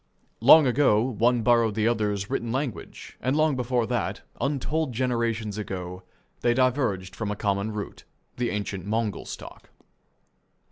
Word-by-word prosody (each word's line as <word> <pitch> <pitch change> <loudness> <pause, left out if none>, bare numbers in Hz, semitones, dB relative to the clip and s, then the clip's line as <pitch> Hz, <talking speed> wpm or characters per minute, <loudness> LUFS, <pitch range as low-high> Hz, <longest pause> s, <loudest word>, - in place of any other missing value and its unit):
Long 145 +6 +8
ago 125 -4 +3
one 120 -1 +1
borrowed 115 -2 +3
the 110 0 +1
other's 105 -4 0
written 120 -3 -2
language, 130 -2 -5
and 130 +2 0
long 155 -2 +3
before 125 -1 0
that, - - -2 0.2
untold 145 +1 -1
generations 115 -4 -1
ago, 90 -3 -5 0.4
they 120 0 +2
diverged 120 -8 0
from 110 -2 -3
a 105 - -2
common 100 +1 -1
root, 105 -1 -6 0.3
the 120 -1 0
ancient 100 -3 -3
Mongol 110 +1 -2
stock. - - -10
115 Hz, 140 wpm, -26 LUFS, 105-130 Hz, 0.4 s, Long